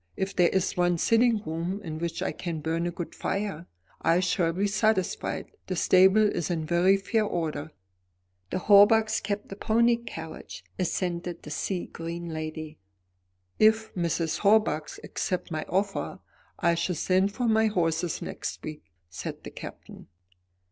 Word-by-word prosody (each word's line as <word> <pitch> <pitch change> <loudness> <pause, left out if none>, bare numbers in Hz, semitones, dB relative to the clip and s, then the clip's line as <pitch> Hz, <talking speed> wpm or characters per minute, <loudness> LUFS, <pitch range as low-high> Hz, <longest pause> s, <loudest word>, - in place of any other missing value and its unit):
If 190 +1 -2
there 175 -2 +5
is 190 -1 0
one 175 -1 +2
sitting 230 +3 +3
room 170 +3 -3
in 155 -3 -5
which 170 +1 -3
I - - -1
can 170 -3 -4
burn 165 +2 -1
a - - -2
good 175 0 -6
fire, 195 -4 -3 0.3
I 170 +2 +3
shall 180 -2 +1
be 190 +4 0
satisfied. 205 -1 0 0.2
The 185 - -2
stable 190 +4 +5
is 175 -6 -2
in 165 -3 -1
very 175 +4 +4
fair 215 +3 0
order." 160 -6 -2 0.8
"The - - -1
Hawbucks 215 +3 +5
kept 205 0 -4
a - - -4
pony 235 +3 +3
carriage," 160 -9 -8 0.2
assented 175 -1 -2
the 150 - -8
sea 180 +4 -2
green 170 +1 -6
lady. 155 -1 -6 0.8
"If 220 0 +4
Mrs. 165 -2 -1
Hawbuck 200 -8 +3
accepts 180 -2 -3
my 155 -1 -3
offer, 195 +2 -1 0.4
I 170 - +2
shall 170 +2 -1
send 190 +4 +2
for 245 +1 -1
my 220 0 +4
horses 170 -4 0
next - - -5
week," 155 -1 -7 0.2
said 85 0 -7
the - - -8
Captain. - - -10
180 Hz, 155 wpm, -27 LUFS, 165-205 Hz, 0.8 s, there